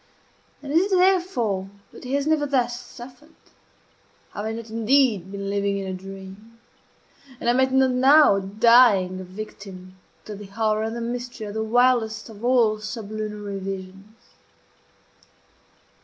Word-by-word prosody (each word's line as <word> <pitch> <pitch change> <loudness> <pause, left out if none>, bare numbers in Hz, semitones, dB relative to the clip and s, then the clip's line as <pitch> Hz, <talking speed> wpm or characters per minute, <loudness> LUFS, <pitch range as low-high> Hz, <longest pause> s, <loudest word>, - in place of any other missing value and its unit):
And 285 0 -5
is 370 +5 +2
it - - +4
therefore 345 - +1 0.2
that - - -13
he 260 +2 -2
has 280 0 0
never 310 -2 +1
thus 245 -3 0
suffered? 255 +7 -13 1.0
Have 205 - -5
I 220 - -2
not 225 0 -8
indeed 225 -4 +2
been 200 0 -5
living 200 0 -1
in 195 - -4
a 190 - -4
dream? 195 +4 -11 0.8
And - - -5
am 240 +2 +3
I 260 - +5
not 265 0 +2
now 260 -3 +5
dying 200 -2 +4
a - - -6
victim 185 -1 -10 0.3
to 215 - -7
the 205 0 -10
horror 215 +1 -1
and 225 +1 -3
the 235 - -5
mystery 240 -1 -5
of 205 - -7
the 220 0 -2
wildest 235 -1 +1
of 215 0 -13
all 235 -4 +3
sublunary 210 -1 -6
visions? 195 +2 -8
220 Hz, 150 wpm, -23 LUFS, 200-250 Hz, 1.0 s, I